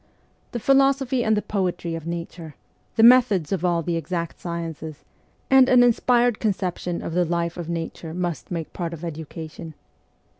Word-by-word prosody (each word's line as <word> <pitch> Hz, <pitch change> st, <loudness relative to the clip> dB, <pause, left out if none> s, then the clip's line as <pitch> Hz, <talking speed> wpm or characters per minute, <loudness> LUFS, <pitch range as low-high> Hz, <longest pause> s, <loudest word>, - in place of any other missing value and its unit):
The -, -, -3 dB
philosophy 270 Hz, -1 st, +3 dB
and 220 Hz, -1 st, +2 dB
the 210 Hz, -, -1 dB
poetry 180 Hz, -4 st, -2 dB
of 165 Hz, -1 st, -6 dB
nature, 170 Hz, -2 st, -6 dB, 0.4 s
the 225 Hz, -, +4 dB
methods 230 Hz, -9 st, +5 dB
of 190 Hz, -3 st, -1 dB
all 170 Hz, -2 st, +1 dB
the 170 Hz, +1 st, -1 dB
exact 170 Hz, 0 st, -4 dB
sciences, 165 Hz, -3 st, -6 dB, 0.4 s
and 265 Hz, -1 st, +6 dB
an 250 Hz, -1 st, +6 dB
inspired 240 Hz, -1 st, +3 dB
conception 185 Hz, -4 st, -2 dB
of -, -, -5 dB
the 180 Hz, +1 st, +2 dB
life 170 Hz, 0 st, -1 dB
of 170 Hz, -2 st, -6 dB
nature 165 Hz, -1 st, -5 dB
must 175 Hz, -2 st, -4 dB
make 165 Hz, -3 st, -5 dB
part 170 Hz, -2 st, -4 dB
of 165 Hz, +2 st, -8 dB
education. 160 Hz, 0 st, -8 dB
175 Hz, 160 wpm, -23 LUFS, 165-220 Hz, 0.4 s, and